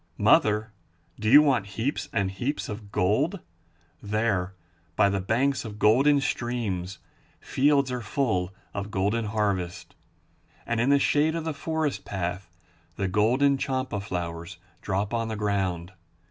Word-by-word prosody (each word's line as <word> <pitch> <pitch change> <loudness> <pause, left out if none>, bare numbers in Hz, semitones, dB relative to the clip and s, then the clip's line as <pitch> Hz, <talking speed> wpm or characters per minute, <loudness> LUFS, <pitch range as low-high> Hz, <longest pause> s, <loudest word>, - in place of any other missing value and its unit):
Mother, 105 +1 +3 0.5
do 110 0 0
you 145 +5 +9
want 130 -9 +2
heaps 140 +5 -2
and 100 -8 0
heaps 125 +9 -3
of 105 -1 -7
gold? 135 - +1 0.6
There, 100 -3 -1 0.4
by 100 - +4
the 100 -1 -1
banks 130 +8 +1
of 105 -3 -8
golden 135 +7 +4
streams, 110 -9 -2 0.4
fields 140 -1 +2
are 125 -1 -3
full 105 -6 -1 0.2
of 100 0 -4
golden 105 +3 0
harvest. 100 -5 -2 0.7
And 115 -1 0
in 125 - +2
the 140 - +6
shade 150 +3 +2
of 165 - -2
the 160 -1 -2
forest 150 -7 -2
path 90 -1 -4 0.5
the 100 - -1
golden 125 +8 +2
champa 130 -5 -2
flowers 85 -2 -5 0.2
drop 100 +2 -2
on 115 -1 0
the 110 - -3
ground. 95 -4 -1
110 Hz, 140 wpm, -26 LUFS, 95-135 Hz, 0.7 s, you